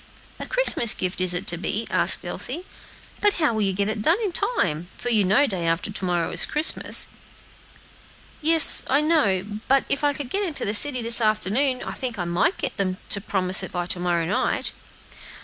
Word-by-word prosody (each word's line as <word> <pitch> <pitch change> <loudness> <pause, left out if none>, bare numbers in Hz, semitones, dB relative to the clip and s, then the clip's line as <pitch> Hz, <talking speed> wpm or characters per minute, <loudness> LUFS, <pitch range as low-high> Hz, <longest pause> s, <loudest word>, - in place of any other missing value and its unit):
"A - - -7
Christmas - - +4
gift 185 0 -3
is 185 -1 +3
it 180 +2 0
to 175 - -3
be?" 210 +5 -3
asked - - +2
Elsie; 360 - -5 0.6
"but 415 -1 +2
how 305 -8 0
will 220 - -2
you 195 -2 0
get 200 +1 -2
it 215 0 -3
done 325 - +3
in 405 - -2
time? 175 - -2
for 245 - -5
you 215 -3 +2
know 210 +10 +3
day 185 -9 -3
after 165 +5 -1
to 195 - -5
morrow 175 -2 -1
is - - +2
Christmas." 300 +2 0 1.3
"Yes, 320 0 +6
I 280 +3 +2
know; 220 - +1 0.2
but 270 0 +2
if 280 - -2
I 290 0 +1
could 275 -3 -7
get 400 - 0
into 330 -7 -2
the 205 - -1
city 255 +2 +3
this 230 +1 +4
afternoon, 220 +5 0
I - - -5
think 245 -4 -5
I 175 - -3
might 175 - 0
get - - -4
them 185 -2 -2
to 200 - +2
promise 190 -2 +4
it 190 - -5
by 175 -1 -3
to 180 - -3
morrow 175 -2 -1
night." 185 - -1
215 Hz, 205 wpm, -22 LUFS, 185-285 Hz, 1.3 s, Yes